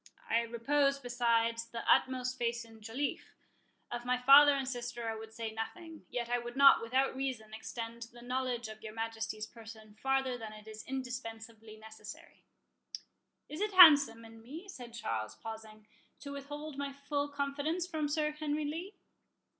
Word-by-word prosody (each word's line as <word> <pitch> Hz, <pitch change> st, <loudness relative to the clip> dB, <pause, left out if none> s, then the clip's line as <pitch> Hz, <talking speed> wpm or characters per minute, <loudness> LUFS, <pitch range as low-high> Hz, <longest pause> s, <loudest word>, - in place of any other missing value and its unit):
I 235 Hz, -, +3 dB
repose, 275 Hz, +5 st, +1 dB
besides, 230 Hz, -2 st, +1 dB
the 230 Hz, 0 st, -6 dB
utmost 255 Hz, -1 st, +3 dB
faith 235 Hz, -1 st, -1 dB
in 225 Hz, -1 st, -16 dB
Joliffe. 235 Hz, +7 st, -4 dB, 0.6 s
Of 240 Hz, 0 st, -4 dB
my 250 Hz, +1 st, +1 dB
father 280 Hz, +3 st, +8 dB
and 270 Hz, -1 st, -2 dB
sister 240 Hz, -2 st, -4 dB
I 225 Hz, -, -1 dB
would 220 Hz, 0 st, -9 dB
say 225 Hz, 0 st, -5 dB
nothing; 315 Hz, +9 st, -7 dB
yet 240 Hz, -1 st, -3 dB
I 245 Hz, 0 st, +1 dB
would 240 Hz, +1 st, -7 dB
not, 275 Hz, 0 st, +8 dB
without 260 Hz, +4 st, +1 dB
reason, 255 Hz, -5 st, -4 dB
extend 230 Hz, +1 st, -6 dB
the 240 Hz, 0 st, -13 dB
knowledge 250 Hz, -1 st, -2 dB
of 215 Hz, 0 st, -10 dB
your 215 Hz, 0 st, -8 dB
Majesty's 225 Hz, -1 st, -3 dB
person 220 Hz, -1 st, -12 dB
farther 265 Hz, -2 st, +1 dB
than 220 Hz, -1 st, -7 dB
it 215 Hz, 0 st, -13 dB
is 215 Hz, 0 st, -8 dB
indispensably 230 Hz, -4 st, -6 dB
necessary." 215 Hz, -1 st, -12 dB, 1.0 s
"Is 305 Hz, +5 st, -6 dB
it 420 Hz, -1 st, 0 dB
handsome 285 Hz, -10 st, +8 dB
in 225 Hz, 0 st, -13 dB
me," 305 Hz, -, -9 dB
said 245 Hz, -11 st, -9 dB
Charles, 110 Hz, -, -3 dB
pausing, 220 Hz, -1 st, -9 dB, 0.4 s
"to 280 Hz, -, -7 dB
withhold 290 Hz, +1 st, -7 dB
my 280 Hz, 0 st, -2 dB
full 285 Hz, +1 st, -2 dB
confidence 285 Hz, +4 st, -2 dB
from 315 Hz, -4 st, -2 dB
Sir 300 Hz, 0 st, +1 dB
Henry 300 Hz, 0 st, -2 dB
Lee?" 335 Hz, +7 st, -5 dB
245 Hz, 160 wpm, -33 LUFS, 225-280 Hz, 1.0 s, father